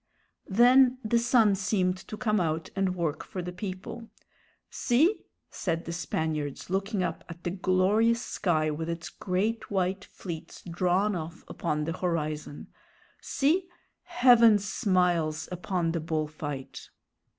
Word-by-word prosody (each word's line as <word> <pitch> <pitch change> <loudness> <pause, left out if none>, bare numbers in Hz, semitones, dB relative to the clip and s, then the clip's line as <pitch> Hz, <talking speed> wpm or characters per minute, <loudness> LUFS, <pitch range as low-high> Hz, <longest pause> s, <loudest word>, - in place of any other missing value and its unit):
Then 250 +5 +6
the 235 +2 +3
sun 235 -3 +4
seemed 190 -1 +1
to 215 - -6
come 215 -2 +1
out 160 -2 -1
and 190 -2 0
work 160 -4 -2
for 185 - -6
the 180 - -5
people. 190 +5 -7 0.6
"See," 310 - +2 0.3
said 165 -2 -2
the 170 - -4
Spaniards, 160 -3 -3
looking 195 0 0
up - - -3
at 170 +1 -10
the 175 - -2
glorious 195 +5 +2
sky 155 -8 0
with 160 +2 -4
its 170 0 -4
great 205 +5 -2
white 190 -1 0
fleets 170 -4 -8
drawn 185 +4 +1
off 165 +1 -6
upon 150 -3 -2
the 165 +2 -2
horizon, 155 -5 -3 0.5
"see 335 +7 +1 0.3
heaven 235 -3 +6
smiles 180 -7 0
upon 180 -1 -1
the 170 - -1
bull 155 -1 -1
fight!" 145 -3 -7
185 Hz, 135 wpm, -28 LUFS, 165-215 Hz, 0.6 s, Then